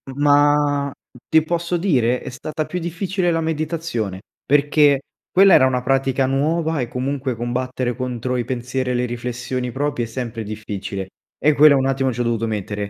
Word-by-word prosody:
Ma 145 0 +3 0.4
ti 160 -1 +4
posso 170 +2 -1
dire? 125 - +1
È - - -6
stata 155 +4 -4
più 180 - -4
difficile 175 +2 -1
la 165 0 0
meditazione 155 - -3 0.2
perché 145 0 +4 0.3
quella 195 0 +6
era 130 - +6
una 125 -1 -1
pratica 135 0 +1
nuova 155 +4 0
e 120 - -2
comunque 130 +1 -3
combattere 125 +1 -2
contro 125 0 -3
i 120 -1 -1
pensieri 125 +1 -2
e - - 0
le 125 0 0
riflessioni 125 +1 -4
proprie 140 -1 -1
è - - -9
sempre 115 -1 -5
difficile 100 -2 -5 0.3
e 150 +2 +3
quella 145 0 +7
un 135 -1 +1
attimo 135 -1 +1
ci 120 0 -3
ho - - +2
dovuto 115 -1 -1
mettere. 105 -1 -3
130 Hz, 170 wpm, -21 LUFS, 120-150 Hz, 0.4 s, quella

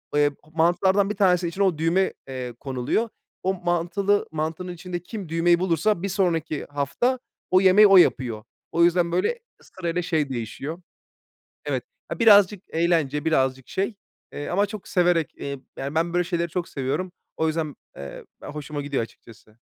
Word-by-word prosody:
eee, 145 0 +4 0.2
mantılardan 190 +4 +3
1 210 - -2
tanesi, 180 -3 +3
içine 190 +4 -1
o 180 -5 +2
düğme, 170 +4 +2
eee, 125 -2 -5
konuluyor. 135 - -1 0.3
O 190 +1 +1
mantılı 185 +4 +1
mantının 160 +3 -3
içinde 175 +1 -5
kim 200 -4 -7
düğmeyi 170 +1 +3
bulursa, 180 +2 +1
bir 200 - -1
sonraki 165 -5 0
hafta 145 - 0 0.3
o 185 +1 +6
yemeği 195 +3 +7
o 195 -1 +7
yapıyor. 120 -10 +3 0.3
O 170 - +3
yüzden, 170 0 +3
böyle, 330 - 0 0.2
sırayla 180 -1 -3
şey 155 -4 0
değişiyor. 135 +7 -5 0.8
Evet, - - -1 0.3
aaa, - - -5
birazcık 205 -3 +6
eğlence, 160 -4 +1
birazcık 130 -4 +1
şey, 200 +3 -2 0.4
eee, 145 - -5
ama 200 +3 +2
çok 205 -1 -8
severek 175 -3 +2
eee, 140 -1 -5 0.2
yani, 140 +3 -4
ben 165 +1 +1
böyle 175 - +2
şeyleri 170 -1 -2
çok 175 +1 -3
seviyorum. 145 +7 -2 0.3
O 160 - +1
yüzden, 155 -2 -2 0.2
eee, 70 -1 -8 0.2
be - - -9
hoşuma 150 0 -5
gidiyor 140 -4 -1
açıkçası. 115 -1 -15
170 Hz, 160 wpm, -24 LUFS, 145-185 Hz, 0.8 s, yemeği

